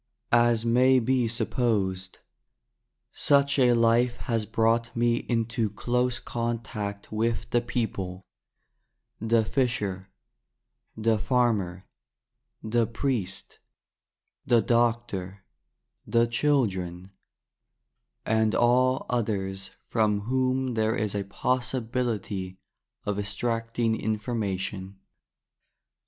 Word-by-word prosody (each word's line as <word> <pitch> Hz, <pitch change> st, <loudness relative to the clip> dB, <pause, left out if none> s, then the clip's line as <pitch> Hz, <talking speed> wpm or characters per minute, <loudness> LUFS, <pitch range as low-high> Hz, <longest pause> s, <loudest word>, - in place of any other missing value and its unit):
As 120 Hz, -1 st, +4 dB
may 130 Hz, +3 st, +5 dB
be 125 Hz, 0 st, +2 dB
supposed, 100 Hz, -5 st, -1 dB, 0.9 s
such 140 Hz, 0 st, +3 dB
a 125 Hz, -2 st, +5 dB
life 120 Hz, +1 st, +3 dB
has 115 Hz, -4 st, -2 dB
brought 115 Hz, +1 st, +1 dB
me 120 Hz, 0 st, +2 dB
into 115 Hz, -2 st, -1 dB
close 125 Hz, +4 st, 0 dB
contact 110 Hz, -4 st, -4 dB
with 115 Hz, +1 st, -1 dB
the 120 Hz, -, +3 dB
people 100 Hz, -6 st, -3 dB, 0.5 s
— -, -, -44 dB
the 115 Hz, -1 st, +4 dB
fisher, 105 Hz, -7 st, -1 dB, 0.9 s
the 110 Hz, 0 st, +2 dB
farmer, 105 Hz, -7 st, 0 dB, 0.8 s
the 115 Hz, +1 st, +1 dB
priest, 115 Hz, -5 st, -3 dB, 0.8 s
the 120 Hz, -, +4 dB
doctor, 115 Hz, -5 st, 0 dB, 0.6 s
the 115 Hz, 0 st, +3 dB
children, 100 Hz, -9 st, 0 dB, 1.1 s
and 110 Hz, -1 st, +2 dB
all 125 Hz, +2 st, +3 dB
others 95 Hz, -5 st, -2 dB, 0.2 s
from 105 Hz, -3 st, +1 dB
whom 130 Hz, +2 st, 0 dB
there 110 Hz, 0 st, +1 dB
is 105 Hz, -5 st, -1 dB
a 100 Hz, -1 st, -2 dB
possibility 110 Hz, -4 st, -2 dB, 0.5 s
of 105 Hz, 0 st, -1 dB
extracting 115 Hz, +2 st, -1 dB
information. 105 Hz, -4 st, -3 dB
115 Hz, 90 wpm, -27 LUFS, 100-120 Hz, 1.1 s, may